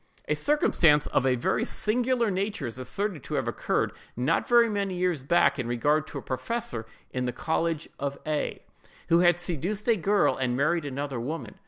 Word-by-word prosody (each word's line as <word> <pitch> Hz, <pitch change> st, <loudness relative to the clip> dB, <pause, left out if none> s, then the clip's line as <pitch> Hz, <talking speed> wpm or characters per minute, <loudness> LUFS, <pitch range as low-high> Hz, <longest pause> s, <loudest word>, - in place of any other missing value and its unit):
A -, -, +2 dB
circumstance 165 Hz, -, +3 dB
of 135 Hz, -, +1 dB
a 130 Hz, -, +3 dB
very 125 Hz, -, 0 dB
singular 240 Hz, 0 st, +1 dB
nature 195 Hz, +3 st, -2 dB
is 120 Hz, +2 st, -6 dB
asserted 160 Hz, +7 st, -2 dB
to 150 Hz, -, -5 dB
have 130 Hz, -4 st, -1 dB
occurred, 120 Hz, -, 0 dB, 0.3 s
not 135 Hz, +7 st, +1 dB
very 235 Hz, -1 st, +6 dB
many 200 Hz, -3 st, -2 dB
years 180 Hz, -5 st, 0 dB
back, 140 Hz, -1 st, +3 dB
in 125 Hz, -, -2 dB
regard 145 Hz, +6 st, +1 dB
to 145 Hz, -, -7 dB
a -, -, -6 dB
professor 130 Hz, -, -3 dB, 0.2 s
in 125 Hz, -1 st, -2 dB
the 125 Hz, -, -1 dB
college 160 Hz, +4 st, -1 dB
of 140 Hz, 0 st, -3 dB
A——, 155 Hz, -1 st, -2 dB, 0.5 s
who 170 Hz, -, +5 dB
had 175 Hz, -1 st, +5 dB
seduced 175 Hz, -, -3 dB
a 230 Hz, -, +5 dB
girl 200 Hz, +2 st, +2 dB
and 125 Hz, -2 st, -1 dB
married 155 Hz, +3 st, +1 dB
another 140 Hz, -2 st, -3 dB
woman. 125 Hz, -3 st, -5 dB
160 Hz, 185 wpm, -27 LUFS, 130-200 Hz, 0.5 s, very